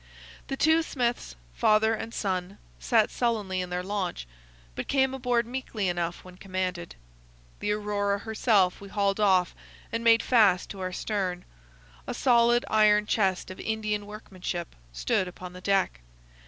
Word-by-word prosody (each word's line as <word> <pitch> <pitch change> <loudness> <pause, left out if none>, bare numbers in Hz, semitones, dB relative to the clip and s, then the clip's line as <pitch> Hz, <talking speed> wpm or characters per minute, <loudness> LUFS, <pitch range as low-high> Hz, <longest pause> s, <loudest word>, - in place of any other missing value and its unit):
The 270 - -3
two 320 +3 +4
Smiths, 240 - -2 0.2
father 215 - +3
and 225 +1 -5
son, 190 -2 -3 0.2
sat 225 -4 +2
sullenly 210 -6 -1
in 180 - -5
their 180 0 -2
launch, 190 - -3 0.5
but - - -5
came 265 -1 +2
aboard 245 -2 0
meekly 235 -5 -3
enough 175 -1 -2
when 180 0 -13
commanded. 185 -3 -4 0.6
The 210 - 0
Aurora 205 -1 -1
herself 205 -3 +1
we 200 - -10
hauled 200 0 0
off 185 -4 +3 0.4
and 230 0 -2
made 230 -1 +5
fast 205 -7 +3
to 195 - -8
our 185 -1 -3
stern. 185 -2 -3 0.6
A - - -3
solid 240 -1 +4
iron 210 -1 +4
chest 190 -4 0
of 185 - -10
Indian 215 -2 -2
workmanship 185 -5 -6 0.2
stood 60 - 0
upon 180 0 -9
the 180 - -10
deck. 195 - +1
205 Hz, 150 wpm, -27 LUFS, 185-225 Hz, 0.6 s, made